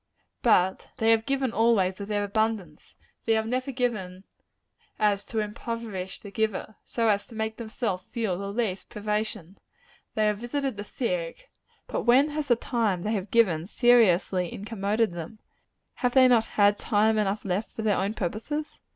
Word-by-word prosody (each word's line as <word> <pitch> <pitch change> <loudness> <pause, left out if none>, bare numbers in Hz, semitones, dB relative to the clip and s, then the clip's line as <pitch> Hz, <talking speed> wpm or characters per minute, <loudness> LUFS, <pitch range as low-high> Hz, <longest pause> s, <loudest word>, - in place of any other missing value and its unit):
But 190 -5 +3
they 225 0 +3
have 225 0 +2
given, 270 -2 0
always, 205 -5 +2
of 200 - -5
their 205 -1 0
abundance. 205 -6 -2 0.3
They 225 - +3
have 220 0 +1
never 255 +4 -2
so - - -4
given 210 -7 -2 0.7
as 205 -1 +2
to 225 - -5
impoverish 210 -3 -4
the 200 - -10
giver 215 0 -2
so 230 -1 -1
as 205 -2 +1
to 230 - -13
make 220 0 -3
themselves 220 -5 -3
feel 220 -6 -2
the 200 +2 -4
least 205 -4 -2
privation. 210 -3 -3 0.6
They 215 - +2
have 210 -1 +1
visited 265 +2 -2
the 205 - -5
sick: - - -4 0.3
but - - -3
when 260 +5 +5
has 300 -1 -3
the 240 - +5
time 225 -7 -1
they 215 - -1
have 200 -2 -3
given, 185 -8 +3
seriously 195 -7 +3
incommoded 210 0 -1
them? 175 +5 -7 0.6
Have 245 -1 0
they 260 -1 +8
not 235 -3 +4
had 205 0 +5
time 215 0 +2
enough 205 0 -1
left 195 +3 -2
for 220 - -6
their 210 -2 +2
own 200 +3 -1
purposes? 225 - -4
215 Hz, 170 wpm, -27 LUFS, 200-235 Hz, 0.7 s, they